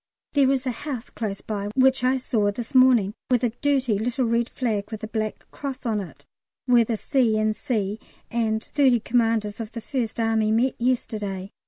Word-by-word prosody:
There 275 Hz, -2 st, +4 dB
is 270 Hz, -1 st, 0 dB
a 255 Hz, -, 0 dB
house 255 Hz, -1 st, -6 dB
close 205 Hz, -4 st, -4 dB
by 205 Hz, -2 st, -4 dB
which 265 Hz, -1 st, +4 dB
I 255 Hz, +1 st, +3 dB
saw 225 Hz, -5 st, 0 dB
this 225 Hz, +5 st, -6 dB
morning 250 Hz, -6 st, +5 dB, 0.2 s
with 250 Hz, -1 st, +2 dB
a 240 Hz, -, +2 dB
dirty 265 Hz, -7 st, +2 dB
little 245 Hz, +3 st, 0 dB
red 235 Hz, +1 st, +1 dB
flag 215 Hz, -5 st, -2 dB
with 220 Hz, -2 st, -7 dB
a -, -, -3 dB
black 215 Hz, -1 st, -3 dB
cross 275 Hz, -2 st, -6 dB
on 220 Hz, -3 st, 0 dB
it, 185 Hz, -, -11 dB, 0.4 s
where 245 Hz, -2 st, +5 dB
the 225 Hz, 0 st, -2 dB
C. 240 Hz, -4 st, +2 dB
in 215 Hz, 0 st, +1 dB
C. 215 Hz, -2 st, -2 dB, 0.3 s
and 225 Hz, -1 st, 0 dB
thirty 265 Hz, -5 st, +3 dB
commanders 225 Hz, -2 st, 0 dB
of 225 Hz, 0 st, -6 dB
the 235 Hz, -, -4 dB
1st 235 Hz, -1 st, -3 dB
Army 225 Hz, -1 st, +2 dB
met 235 Hz, +4 st, +2 dB
yesterday. 210 Hz, -6 st, -2 dB
230 Hz, 190 wpm, -24 LUFS, 215-255 Hz, 0.4 s, morning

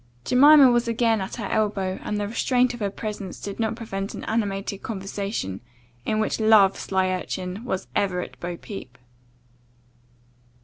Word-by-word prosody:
Jemima 280 Hz, +1 st, +7 dB
was 240 Hz, 0 st, +2 dB
again 230 Hz, -2 st, +2 dB
at 190 Hz, -, -5 dB
her 220 Hz, -, -5 dB
elbow, 195 Hz, -3 st, -1 dB
and 210 Hz, -, -3 dB
the 205 Hz, -, -1 dB
restraint 245 Hz, +3 st, +1 dB
of 240 Hz, -, -8 dB
her 205 Hz, -2 st, -1 dB
presence 205 Hz, -2 st, -6 dB
did 200 Hz, +1 st, -6 dB
not 225 Hz, 0 st, 0 dB
prevent 195 Hz, -4 st, -5 dB
an -, -, -7 dB
animated 200 Hz, -3 st, -2 dB
conversation, 195 Hz, -, -4 dB, 0.5 s
in 215 Hz, -, +1 dB
which 215 Hz, -, 0 dB
love, 215 Hz, -3 st, +6 dB
sly 190 Hz, -1 st, 0 dB
urchin, 185 Hz, +2 st, -4 dB
was 190 Hz, -7 st, -3 dB
ever 190 Hz, -3 st, +1 dB
at -, -, -9 dB
bo 175 Hz, 0 st, -5 dB
peep. 130 Hz, -, -9 dB
205 Hz, 160 wpm, -24 LUFS, 190-225 Hz, 0.5 s, Jemima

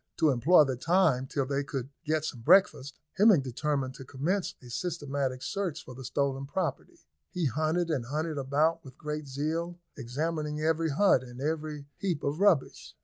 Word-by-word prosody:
To 160 Hz, -3 st, +4 dB
employ 150 Hz, +7 st, +6 dB
the 135 Hz, -3 st, -1 dB
time 165 Hz, -4 st, +2 dB
till 135 Hz, 0 st, -1 dB
they 140 Hz, +1 st, -1 dB
could 135 Hz, -2 st, -5 dB, 0.2 s
get 155 Hz, 0 st, 0 dB
some 120 Hz, -6 st, -5 dB
breakfast, 145 Hz, -, +4 dB, 0.2 s
Hemming 205 Hz, -7 st, +7 dB
determined 135 Hz, +1 st, -2 dB
to 135 Hz, -, -10 dB
commence 160 Hz, +9 st, -2 dB
a 125 Hz, -2 st, -13 dB
systematic 140 Hz, -4 st, -2 dB
search 195 Hz, -1 st, -3 dB
for 130 Hz, -, -9 dB
the 130 Hz, +2 st, -9 dB
stolen 135 Hz, +1 st, -1 dB
property. 165 Hz, -2 st, -3 dB, 0.3 s
They 180 Hz, -3 st, 0 dB
hunted 155 Hz, +6 st, 0 dB
and 130 Hz, -6 st, -1 dB
hunted 155 Hz, +3 st, -2 dB
about 155 Hz, +5 st, +1 dB
with 130 Hz, -2 st, -13 dB
great 150 Hz, -1 st, -5 dB
zeal, 160 Hz, +6 st, -3 dB, 0.2 s
examining 150 Hz, +4 st, -3 dB
every 160 Hz, +1 st, +1 dB
hut 155 Hz, -1 st, +4 dB
and 125 Hz, -1 st, -11 dB
every 150 Hz, 0 st, -3 dB
heap 175 Hz, -7 st, -2 dB
of 145 Hz, +3 st, -1 dB
rubbish. 195 Hz, -9 st, +1 dB
150 Hz, 170 wpm, -29 LUFS, 135-165 Hz, 0.3 s, Hemming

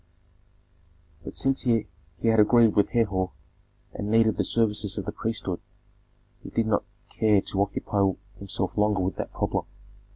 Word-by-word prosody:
But -, -, -8 dB
since 135 Hz, 0 st, +1 dB
he 115 Hz, -4 st, +2 dB, 0.4 s
had 115 Hz, -1 st, +4 dB
agreed 115 Hz, 0 st, +5 dB
with 100 Hz, -, +3 dB
Herhor, 100 Hz, -6 st, +1 dB, 0.6 s
and 105 Hz, -, -4 dB
needed 110 Hz, 0 st, +4 dB
the -, -, +2 dB
services 105 Hz, -2 st, +1 dB
of 100 Hz, -, -3 dB
the -, -, -3 dB
priesthood, 105 Hz, -5 st, -3 dB, 0.8 s
he -, -, -9 dB
did 115 Hz, -, 0 dB
not 110 Hz, -1 st, +1 dB, 0.3 s
care 105 Hz, -2 st, +3 dB
to 95 Hz, 0 st, -2 dB
occupy 100 Hz, -1 st, 0 dB, 0.3 s
himself 95 Hz, -2 st, -3 dB
longer 105 Hz, -2 st, +2 dB
with 95 Hz, +1 st, -2 dB
that -, -, -4 dB
problem. -, -, -1 dB
105 Hz, 150 wpm, -26 LUFS, 100-115 Hz, 0.8 s, agreed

